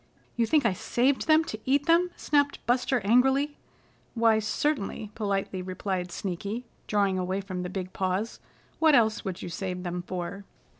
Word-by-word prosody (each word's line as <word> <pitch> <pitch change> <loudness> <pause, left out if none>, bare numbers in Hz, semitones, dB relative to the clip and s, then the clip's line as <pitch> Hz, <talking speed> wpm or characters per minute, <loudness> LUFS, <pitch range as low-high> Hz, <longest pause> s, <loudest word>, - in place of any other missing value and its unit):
"You 235 -1 +1
think 300 -2 +3
I 215 - +3
saved 255 +8 +1
them 315 0 +6
to 215 - -5
eat 280 +2 +2
them?" 340 +2 +4
snapped 285 -1 +1
Buster 250 0 +2
angrily. 265 +7 +3 0.6
"Why, 225 -1 +4
certainly," 215 -2 -1
politely 195 -3 -2
replied 185 -1 -3
Sneaky 200 +7 -4 0.2
drawing 200 -3 +2
away 185 +2 -1
from 190 -2 -5
the 180 - -4
big 185 -1 -5
paws. 190 +4 -2 0.4
"What 315 -2 +6
else 220 -3 +3
would 190 -4 -5
you - - -5
save 180 0 -4
them 180 0 -3
for?" 185 +2 -5
210 Hz, 160 wpm, -27 LUFS, 185-260 Hz, 0.6 s, them